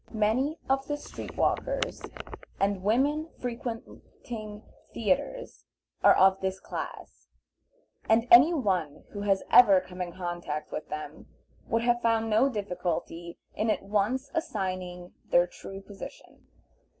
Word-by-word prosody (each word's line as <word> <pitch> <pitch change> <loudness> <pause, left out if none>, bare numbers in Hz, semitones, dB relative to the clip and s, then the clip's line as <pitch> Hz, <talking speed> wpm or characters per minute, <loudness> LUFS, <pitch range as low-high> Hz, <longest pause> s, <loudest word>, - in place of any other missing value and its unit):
Many 235 +8 +1
of 270 0 +1
the 290 - -1
street - - -9
walkers - - 0 0.6
and 195 -1 +1
women 280 - +1
frequenting 230 -2 -7 0.3
theatres 230 - -1 0.4
are - - +8
of 190 0 +5
this 190 0 -2
class, - - -7 0.8
and 225 +2 +4
any 255 +8 +9
one 185 - -1
who 205 - -6
has 195 -1 +1
ever 200 -6 +8
come 185 0 -9
in 175 -1 -3
contact 175 -4 -4
with - - -5
them 150 0 -7 0.4
would 230 0 +1
have 240 0 +2
found 225 -1 +1
no 225 +6 +4
difficulty 180 -5 -4 0.2
in 220 +1 -1
at 215 - 0
once 215 +7 0
assigning 185 - -3 0.2
their 175 0 +5
true 195 +2 -10
position. 195 0 -11
210 Hz, 125 wpm, -28 LUFS, 185-240 Hz, 0.8 s, any